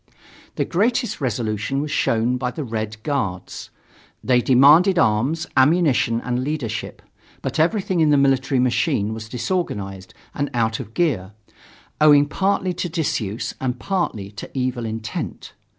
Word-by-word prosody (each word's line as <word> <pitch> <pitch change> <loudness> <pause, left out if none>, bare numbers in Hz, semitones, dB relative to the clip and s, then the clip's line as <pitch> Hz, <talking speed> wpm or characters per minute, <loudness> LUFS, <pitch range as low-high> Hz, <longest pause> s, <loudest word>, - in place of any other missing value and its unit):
The - - 0
greatest 230 - 0
resolution 115 +1 -1
was 150 +1 -3
shown 115 -1 +1
by 125 -1 -2
the 150 +5 -5
Red 110 -2 -5
Guards. 130 - -3 0.5
They 125 -1 +3
demanded 150 +10 +6
arms, 130 +8 +2
ammunition, 130 -5 +3
and 125 +1 -2
leadership. 130 -6 -4 0.4
But 135 +3 -3
everything 185 +1 +1
in 155 -2 +4
the 145 - +4
military 135 -1 +2
machine 125 - +1
was 110 0 -8
disorganized 105 - -3 0.2
and 145 0 -2
out 115 -1 0
of 110 - -9
gear, 105 - 0 0.7
owing 145 -1 +7
partly 190 +3 0
to 175 - -3
disuse 125 - -2
and 125 -1 -1
partly 170 - -2
to 105 - -9
evil 125 -2 -1
intent. 110 0 -5
130 Hz, 135 wpm, -21 LUFS, 110-155 Hz, 0.7 s, owing